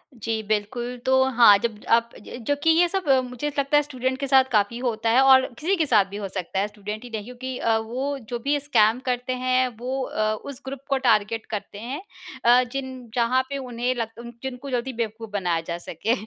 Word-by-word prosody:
जी, 225 -1 -2
बिल्कुल। 215 +4 -2
तो 260 0 +4 0.2
हाँ, 205 -4 +9
जब 225 -3 -2 0.2
आप 235 0 0
ज 210 - -9
जो 285 - +3
कि 325 - +4
ये 335 +2 +5
सब 380 -2 -2
अ, 265 -1 +6
मुझे 250 +2 -5
लगता 280 +1 +3
है - - +5
स्टूडेंट 260 -2 -2
के 280 - -2
साथ 265 -1 +6
काफ़ी 210 +1 +2
होता 230 -3 -1
है 245 +4 +5
और 265 -1 +7
किसी 370 +6 +1
के 320 - +2
साथ 215 -8 +4
भी 200 - -6
हो 205 -1 -4
सकता 190 0 -4
है 200 - +1
स्टूडेंट 210 +1 -7
ही 245 - -9
नहीं, 220 -2 -4
क्योंकि 250 +1 -6
अ, 225 -2 +2
वो 255 +6 -3
जो 240 -1 -3
भी 285 +4 0
स्कैम 245 -5 +3
करते 250 0 -1
हैं 255 0 +3
वो 255 +3 -3
अ, 215 -3 -1
उस 280 -1 -7
ग्रुप 270 0 -5
को 275 - +2
टारगेट 225 -3 +1
करते 205 -2 -5
हैं 250 - -5 0.4
अ, 245 +1 +6
जिन 260 -2 -6
जहाँ 245 +2 +3
पे 280 - -3
उन्हें 250 -1 -2
लग 235 0 -5
जिनको 265 +1 -6
जल्दी 255 +1 -2
बेवकूफ़ 225 -1 -4
बनाया 175 -5 0
जा 170 - -3
सके। 175 +6 -2
245 Hz, 220 wpm, -24 LUFS, 220-265 Hz, 0.4 s, हाँ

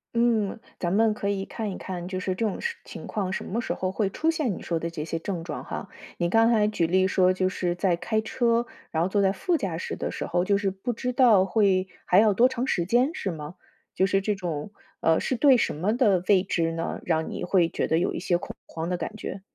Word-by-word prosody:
嗯， 230 -3 +2 0.2
咱 175 -1 -1
们 220 +2 +3
可 200 -1 -3
以 195 -1 -1
看 220 -3 -4
一 - - -6
看 180 -2 -6
就 185 0 -3
是 185 0 -1
这 205 - -3
种 210 - -1
事 470 0 -2
情 - - -9
况 195 -3 -2
什 - - -3
么 230 +5 -2
时 - - -3
候 185 0 -2
会 195 0 0
出 320 +10 +1
现 285 - -1
你 - - -9
说 170 -2 -1
的 170 - -3
这 155 -2 -5
些 165 0 -3
症 175 -2 -4
状 - - -5
哈。 - - -6 0.3
你 175 - +1
刚 225 +3 +4
才 210 -2 +3
举 170 -6 0
例 185 +2 +3
说， 185 -1 +3
就 185 0 +1
是 180 -2 -1
在 180 -1 +1
开 220 +5 -1
车， 235 +1 +1 0.2
然 160 +1 0
后 - - +1
坐 200 +1 +1
在 190 -1 +3
副 355 - 0
驾 185 - -2
驶 - - -4
的 - - -3
时 - - -4
候， 175 +1 0
就 200 0 +3
是 195 -1 0
不 215 +6 -4
知 250 +2 -3
道 225 -7 +5
会 190 -1 +2 0.2
还 180 - +3
要 215 -2 +5
多 245 +6 +5
长 250 0 -2
时 175 -10 0
间 245 - +3
是 195 - -3
吗？ 155 -1 -6 0.4
就 190 - +2
是 195 +1 +2
这 210 +2 0
种 175 -2 -4 0.3
呃， 160 0 +3
是 260 - -1
对 265 0 +6
什 - - 0
么 195 +9 0
的 200 -8 +3
未 195 -3 +5
知 165 -3 0
呢， 165 0 -3
让 160 -2 0
你 - - -5
会 175 -2 +3
觉 - - -1
得 160 - +2
有 - - 0
一 - - -3
些 175 0 +1
恐 - - -8
慌 165 +1 -5
的 180 - -1
感 215 - -5
觉？ 195 -3 -6
195 Hz, 280 characters per minute, -26 LUFS, 175-220 Hz, 0.4 s, 对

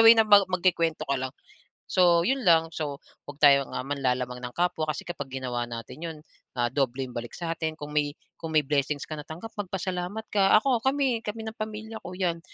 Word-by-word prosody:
way 225 0 +9
na 220 - +6
magku-kuwento 185 -5 +3
ka 140 -2 -1
lang. 130 0 -4 0.6
So 175 -2 +5
yun 270 +2 +1
lang, 165 -6 +4
so 150 -3 -3 0.3
'wag 145 - -8
tayong, 140 -2 +5
ah, - - -3
manlalamang 125 -3 -1
ng 125 0 -7
kapwa 175 -3 0
kasi 155 - -3
kapag 145 -5 -6
ginawa 125 -2 -3
natin 115 +4 -7
yun, 165 -2 -5 0.4
ah, 120 0 0
dobleng 130 -2 -1
balik 120 0 -6
sa 170 -2 -3
atin 160 -1 -3
kung 150 -1 -8
may 145 -1 0 0.2
kung 165 - -5
may 150 - +5
blessings 145 0 0
ka - - -11
natanggap, 160 +9 -8
magpasalamat 185 +2 -3
ka. 195 0 +5
Ako 245 +1 +3
kami 265 -2 +1
kami 220 +1 -5
ng 220 - -4
pamilya 220 0 -6
ko 180 - -8
'yan, 175 -3 0
165 Hz, 195 wpm, -27 LUFS, 140-195 Hz, 0.6 s, way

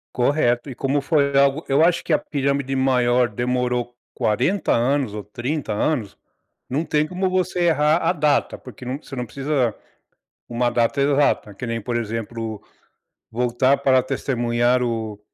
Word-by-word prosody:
Correto 125 -1 +1
e 130 - -7
como 140 +3 0
foi 140 -1 +1
algo 140 +3 +3
eu 140 +3 +3
acho 170 0 +3
que 165 - -1
a - - +5
pirâmide 140 -1 -2
maior 125 -2 +2
demorou 125 +1 -1 0.2
40 125 - 0
anos 125 -1 +1
ou 105 -1 -6
30 120 +3 -3
anos. 110 -2 -1 0.5
Não 145 +6 -1
tem 150 0 +1
como 185 +3 -2
você 185 -1 0
errar 155 -1 +3
a 180 - +1
data, 150 -3 +1
porque 125 0 -12
não 130 +2 -3
você 145 - -15
não 125 -2 -3
precisa 135 -2 -1 0.7
uma 120 0 0
data 120 +4 +1
exata 140 -6 +2
que 125 +5 -6
nem, 115 0 -2
por 120 +2 -4
exemplo, 115 -1 -4 0.7
voltar 125 +3 +1
para 130 -1 +4
testemunhar 125 -2 0
o 110 -3 -3
130 Hz, 155 wpm, -22 LUFS, 120-145 Hz, 0.7 s, a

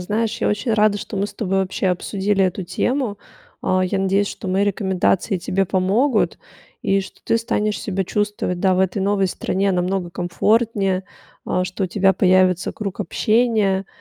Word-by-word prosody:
знаешь, 210 +4 -2
я - - +1
очень 215 +3 0
рада, 210 -1 +3
что 205 - -6
мы 195 +1 0
с - - -12
тобой 195 -3 -1
вообще 190 0 -1
обсудили 195 +2 0
эту 185 0 -2
тему. 215 +4 -1 0.4
А, 185 0 +1
я 190 +1 -1
надеюсь, 195 +1 +2
что 190 - -6
мои 195 +2 +2
рекомендации 190 0 0
тебе 190 +3 0
помогут 205 +7 +1 0.4
и 195 0 +2
что 190 - -11
ты 230 - +2
станешь 215 -2 -1
себя 195 -1 -2
чувствовать, 205 -2 -2
да, 185 0 +3
в 185 - +1
этой 190 +1 0
новой 195 0 +1
стране 195 +2 -1
намного 180 0 -1
комфортнее, 195 +2 +1 0.4
а, 180 - 0
что 185 +2 -3
у - - 0
тебя 195 +1 +3
появится 185 0 +3
круг 200 -3 -5
общения. 210 -1 +1
195 Hz, 170 wpm, -21 LUFS, 185-210 Hz, 0.4 s, рада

